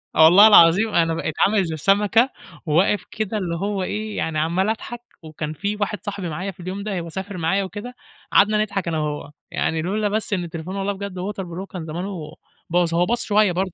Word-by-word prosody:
والله 175 +7 +8
العظيم 200 +2 +6
أنا 165 -1 +3
بقيت 160 -1 -3
عامل 205 -1 +2
زي 160 -1 -4
سمكة 210 - +3 0.4
وواقف 180 +6 +2
كده 215 0 -2
اللي 175 -4 -2
هو 195 +2 -2
إيه 215 +2 -4
يعني 155 -1 -1
عمّال 175 +6 +1
أضحك، 235 +2 -4 0.2
وكان 155 -1 -5
في 200 +6 -3
واحد 210 0 -2
صاحبي 200 -4 -4
معايا 185 +6 -4
في 180 - -25
اليوم 185 +3 -5
ده 200 -3 -3
هو 170 -1 -6
سافر 190 +2 -6
معايا 175 +4 +1
وكده، 210 +6 -7 0.4
قعدنا 210 +1 +4
نضحك 200 -4 -2
أنا 160 -2 -1
وهو، 150 -1 -4 0.2
يعني 160 0 -1
لولا 205 +4 -1
بس 215 0 -2
إن 185 -3 0
التليفون 170 +2 -6
والله 200 +1 -1
بجد 195 -2 -6
waterproof 195 +2 -4 0.2
هو 195 - -5
كان 180 -4 -7
زمانه 165 -1 -6 0.3
باظ، 170 -1 +1
هو 175 +1 +3
باظ 240 +5 0
شوية 210 -3 +3
برضه 185 +2 -1
190 Hz, 205 wpm, -22 LUFS, 165-205 Hz, 0.4 s, والله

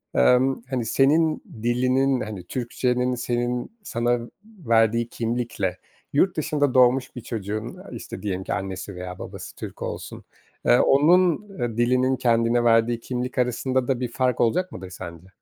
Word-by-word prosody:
emm, 125 - +4
hani, 125 -4 -1
senin 155 +7 +3 0.2
dilinin, 130 +2 +2
hani, 105 -4 -6
Türkçenin 125 +4 -1
senin, 120 - -2
sana 120 - 0 0.3
verdiği 115 - +1
kimlikle 115 -5 -2 0.4
yurt 180 +5 +2
dışında 145 -3 +1
doğmuş 130 +1 +4
bir 125 - -6
çocuğun, 110 -1 -4
eee, - - -12
işte, - - -7
diyelim 95 -3 -3
ki - - -3
annesi 95 0 -5
veya 90 0 -7
babası - - -8
Türk - - -8
olsun, - - -6 0.4
eee, 120 - +5
onun, 175 +7 +4
eee, 120 -2 -2
dilinin 125 +2 +3
kendine 120 -1 +2
verdiği 115 0 +3
kimlik 125 +1 -4
arasında 125 +1 0
da 130 -2 0
bir 125 -2 -3
fark 125 0 0
olacak 180 +11 +1
mıdır 95 0 -8
sence? 90 -1 -9
120 Hz, 150 wpm, -24 LUFS, 115-130 Hz, 0.4 s, eee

